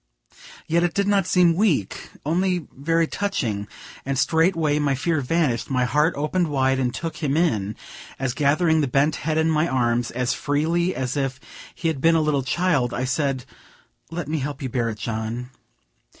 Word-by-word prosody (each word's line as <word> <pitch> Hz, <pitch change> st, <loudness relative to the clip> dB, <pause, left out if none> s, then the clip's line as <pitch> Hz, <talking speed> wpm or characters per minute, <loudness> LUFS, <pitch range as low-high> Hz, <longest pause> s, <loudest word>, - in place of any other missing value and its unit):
Yet 170 Hz, +2 st, +2 dB
it 175 Hz, -1 st, 0 dB
did 200 Hz, 0 st, +1 dB
not 200 Hz, -3 st, +2 dB
seem 180 Hz, -3 st, +4 dB
weak, 165 Hz, -, 0 dB, 0.2 s
only 175 Hz, +1 st, 0 dB
very 165 Hz, +4 st, +1 dB
touching, 120 Hz, -, -2 dB, 0.4 s
and 135 Hz, 0 st, -2 dB
straightway 160 Hz, -1 st, +2 dB
my 140 Hz, -2 st, +1 dB
fear 155 Hz, +3 st, 0 dB
vanished, 135 Hz, -4 st, 0 dB
my 125 Hz, -2 st, +1 dB
heart 150 Hz, +5 st, +2 dB
opened 165 Hz, +4 st, 0 dB
wide 135 Hz, -2 st, +1 dB
and 125 Hz, -2 st, 0 dB
took 165 Hz, +5 st, -5 dB
him 150 Hz, -2 st, 0 dB
in, 110 Hz, -, +1 dB, 0.4 s
as, 130 Hz, -2 st, -1 dB
gathering 155 Hz, +3 st, +2 dB
the 145 Hz, -, +1 dB
bent 140 Hz, +4 st, +2 dB
head 155 Hz, +1 st, -1 dB
in 160 Hz, 0 st, +2 dB
my 155 Hz, +1 st, +2 dB
arms, 120 Hz, -2 st, +1 dB
as 125 Hz, 0 st, -1 dB
freely 165 Hz, +5 st, 0 dB
as 130 Hz, 0 st, -2 dB
if 135 Hz, -2 st, -2 dB, 0.4 s
he 165 Hz, -, -2 dB
had 155 Hz, -5 st, -1 dB
been 165 Hz, +2 st, +4 dB
a 160 Hz, -, +3 dB
little 150 Hz, -2 st, +1 dB
child, 140 Hz, -3 st, 0 dB
I 125 Hz, -, -2 dB
said, 130 Hz, 0 st, -1 dB, 0.6 s
"Let 165 Hz, -3 st, -5 dB
me 155 Hz, +1 st, -1 dB
help 145 Hz, +1 st, -4 dB
you 130 Hz, -, -2 dB
bear 120 Hz, -1 st, 0 dB
it, 110 Hz, -, -5 dB
John." 115 Hz, +3 st, -4 dB
145 Hz, 180 wpm, -23 LUFS, 130-165 Hz, 0.6 s, seem